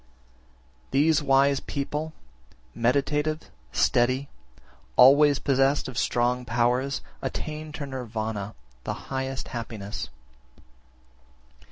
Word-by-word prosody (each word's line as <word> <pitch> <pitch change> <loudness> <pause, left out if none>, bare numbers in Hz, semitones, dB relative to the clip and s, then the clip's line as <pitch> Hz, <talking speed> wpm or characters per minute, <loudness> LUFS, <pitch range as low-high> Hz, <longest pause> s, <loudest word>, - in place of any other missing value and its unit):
23. 135 - +1
These 160 -2 +4
wise 140 0 +4
people, 150 +2 -3 0.6
meditative, 145 +5 0 0.2
steady, 120 - +2 0.7
always 140 +3 +7
possessed 135 +1 +2
of 130 - -7
strong 125 +1 +1
powers, 125 +3 +1 0.2
attain 155 0 -4
to 150 - -4
Nirvana, 110 -6 -4 0.3
the - - -2 0.2
highest 135 0 -3
happiness. 110 - -5
130 Hz, 85 wpm, -26 LUFS, 120-140 Hz, 0.7 s, always